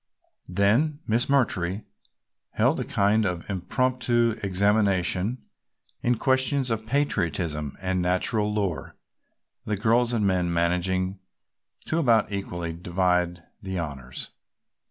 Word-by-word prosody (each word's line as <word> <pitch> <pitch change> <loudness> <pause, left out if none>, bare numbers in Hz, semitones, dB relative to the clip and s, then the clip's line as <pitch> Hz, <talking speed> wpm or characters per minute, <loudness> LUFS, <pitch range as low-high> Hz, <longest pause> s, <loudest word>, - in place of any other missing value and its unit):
Then 110 - +2
Miss 115 +3 +1
McMurtry 105 -8 +1 0.7
held - - +2
a - - -1
kind 105 +2 +2
of 90 -4 -2
impromptu 120 +4 +1
examination 100 +2 +1 0.6
in 120 0 +2
questions 130 +1 +1
of 110 0 -2
patriotism 85 - -1
and 95 -1 0
nature 90 +5 +1
lore, 105 -5 -2 0.7
the 105 -1 -1
girls 115 +3 +2
and 110 -4 +1
men 90 -2 +1
managing 90 +3 0 0.7
to 160 - 0
about 115 -9 +3
equally 85 -4 -4
divide 90 0 0 0.2
the 95 -2 -4
honors. 70 -6 -5
100 Hz, 110 wpm, -26 LUFS, 90-115 Hz, 0.7 s, about